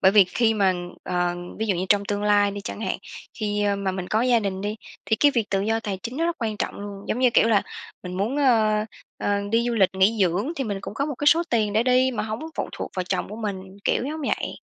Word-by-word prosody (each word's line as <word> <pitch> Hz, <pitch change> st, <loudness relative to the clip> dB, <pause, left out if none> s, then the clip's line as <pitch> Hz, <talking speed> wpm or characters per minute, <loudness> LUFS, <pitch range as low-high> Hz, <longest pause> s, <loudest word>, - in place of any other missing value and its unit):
bởi 190 Hz, +1 st, +5 dB
vì 205 Hz, -3 st, +8 dB
khi 225 Hz, +5 st, +1 dB
mà, 195 Hz, -3 st, +3 dB, 0.3 s
ờ, 175 Hz, -1 st, -1 dB, 0.2 s
ví 220 Hz, -, -1 dB
dụ 200 Hz, -, +2 dB
như 185 Hz, +2 st, -2 dB
trong 205 Hz, -1 st, +3 dB
tương 205 Hz, 0 st, -2 dB
lai 205 Hz, -1 st, +4 dB
đi 200 Hz, 0 st, -6 dB
chẳng 200 Hz, -, -6 dB
hạn, 190 Hz, -4 st, -2 dB, 0.4 s
khi, 210 Hz, -1 st, -1 dB
a, 205 Hz, -1 st, +1 dB
mà 195 Hz, -1 st, -1 dB
mình 185 Hz, -1 st, -5 dB
có 220 Hz, -, +2 dB
gia 245 Hz, -2 st, +4 dB
đình 195 Hz, -2 st, -3 dB
đi, 210 Hz, +2 st, -3 dB, 0.3 s
thì 220 Hz, -, +1 dB
cái 290 Hz, -, +5 dB
việc 225 Hz, -3 st, 0 dB
tự 195 Hz, -1 st, +1 dB
do 225 Hz, +2 st, 0 dB
tài 200 Hz, -4 st, -4 dB
chính 240 Hz, +2 st, -5 dB
nó 330 Hz, -, 0 dB
rất 340 Hz, -, -1 dB
quan 215 Hz, -2 st, -1 dB
trọng -, -, -2 dB
luôn. 200 Hz, -1 st, -7 dB
Giống 225 Hz, -, 0 dB
như 255 Hz, -1 st, +4 dB
kiểu 230 Hz, -, +4 dB
là, 205 Hz, -3 st, +4 dB, 0.4 s
mình 180 Hz, 0 st, -6 dB
muốn, 220 Hz, +9 st, -1 dB
ơ, 220 Hz, -6 st, +3 dB, 0.3 s
ơ, 205 Hz, 0 st, +1 dB
đi 230 Hz, +1 st, +2 dB
du 240 Hz, -, 0 dB
lịch 195 Hz, -4 st, +4 dB
nghỉ 195 Hz, +4 st, +3 dB
dưỡng, 190 Hz, -, +1 dB
thì 270 Hz, -, -1 dB
mình 205 Hz, -4 st, -3 dB
cũng 205 Hz, -, -7 dB
có 280 Hz, -, -1 dB
một 295 Hz, -, -3 dB
cái 290 Hz, -, -4 dB
số 330 Hz, +3 st, +6 dB
tiền 215 Hz, -3 st, +1 dB
để 220 Hz, +2 st, +3 dB
đi 255 Hz, +1 st, +3 dB
mà 240 Hz, -, -2 dB
hổng 215 Hz, +1 st, -4 dB, 0.2 s
phụ -, -, -2 dB
thuộc -, -, -5 dB
vào 185 Hz, -, -1 dB
chồng -, -, -2 dB
của 210 Hz, -, -7 dB
mình, 195 Hz, -3 st, -5 dB
kiểu -, -, +1 dB
giống 310 Hz, +3 st, -4 dB
vậy. 270 Hz, -, -2 dB
210 Hz, 280 wpm, -24 LUFS, 195-235 Hz, 0.4 s, vì